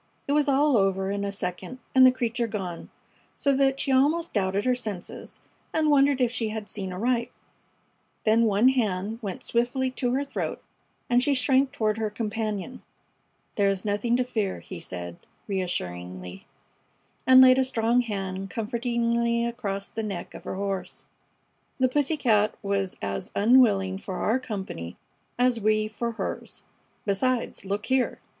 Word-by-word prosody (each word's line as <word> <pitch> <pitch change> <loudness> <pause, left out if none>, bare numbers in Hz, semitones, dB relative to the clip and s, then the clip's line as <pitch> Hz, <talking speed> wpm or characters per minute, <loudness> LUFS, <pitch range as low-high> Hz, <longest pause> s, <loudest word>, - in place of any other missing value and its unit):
It - - -1
was 295 0 +3
all 280 -1 +4
over 195 -1 +1
in 200 0 -2
a 200 - -2
second 190 +5 -5 0.2
and 260 - +7
the - - +6
creature 240 -1 -1
gone, 190 -5 -5 0.5
so 280 - +2
that 270 0 +2
she 275 - +1
almost 300 +6 +2
doubted 200 0 0
her 255 - +3
senses 215 -7 -7 0.3
and 310 -1 +2
wondered 280 -1 +4
if 245 -2 +2
she 225 -2 -2
had 215 -1 -5
seen 190 -3 -5
aright. 235 +5 0 0.9
Then 225 +1 +4
one 215 +4 +4
hand 215 -4 -1
went 195 -5 -5
swiftly 245 +2 0
to 250 -1 -1
her 275 +2 +1
throat 280 - -4 0.5
and 245 0 +3
she 280 +2 +2
shrank 265 +1 +3
toward 220 -5 0
her 220 -1 0
companion. 215 +1 -4 0.8
"There 200 -1 +4
is 195 0 -2
nothing 210 +4 +1
to 255 - +2
fear," 220 -6 -2
he 185 - -9
said, 85 - -6 0.3
reassuringly, 90 - -4 0.8
and 260 0 +9
laid 260 0 +8
a - - +4
strong 235 -1 +2
hand 195 -4 -4
comfortingly 235 +2 0
across 205 -5 -4
the 225 - -3
neck 200 -5 -5
of - - -11
her - - -4
horse. 195 -1 -4 0.7
"The 260 - +4
pussy 290 +4 0
cat 215 -6 +2
was 195 -1 -1
as 100 0 -3
unwilling 200 -4 +4
for 190 -1 -6
our 225 +7 +1
company 190 - -6 0.4
as 245 -2 +2
we 215 0 +2
for 230 +2 -4
hers. - - -5 0.4
Besides, 235 +3 0
look 200 +2 -2
here!" 260 -1 +1
225 Hz, 160 wpm, -26 LUFS, 195-255 Hz, 0.9 s, and